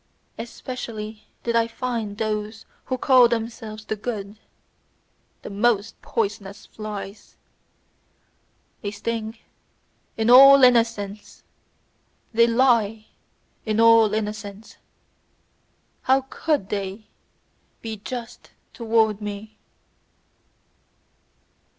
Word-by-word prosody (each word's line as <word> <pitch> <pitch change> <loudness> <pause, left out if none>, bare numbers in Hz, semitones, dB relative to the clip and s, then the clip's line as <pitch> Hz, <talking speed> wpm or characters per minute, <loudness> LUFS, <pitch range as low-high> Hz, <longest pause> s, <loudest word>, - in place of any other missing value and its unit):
Especially 225 -2 -7 0.2
did 235 -1 -1
I 230 0 +3
find 230 -4 -4
those 215 0 -3 0.2
who 255 - -2
call 255 -1 +6
themselves 225 -2 -4
"the 215 - -2
good," 210 -2 -6 1.0
the - - -7
most 210 0 0
poisonous 210 - -3
flies; 210 -1 -8 1.5
they 205 - -3
sting 220 +2 -4 0.8
in 225 +1 +2
all 275 +2 +9
innocence, 230 -4 +1 0.9
they 230 +1 +5
lie 230 -3 +2 0.5
in 215 -1 -1
all 225 -2 +6
innocence; 210 -1 -5 1.2
how 265 +1 +3
COULD 300 -12 -1
they 200 +1 -4 0.8
be 220 -1 -5
just 235 +3 -8 0.2
towards 220 -2 +1
me! 210 +1 -7
220 Hz, 85 wpm, -23 LUFS, 210-235 Hz, 1.5 s, all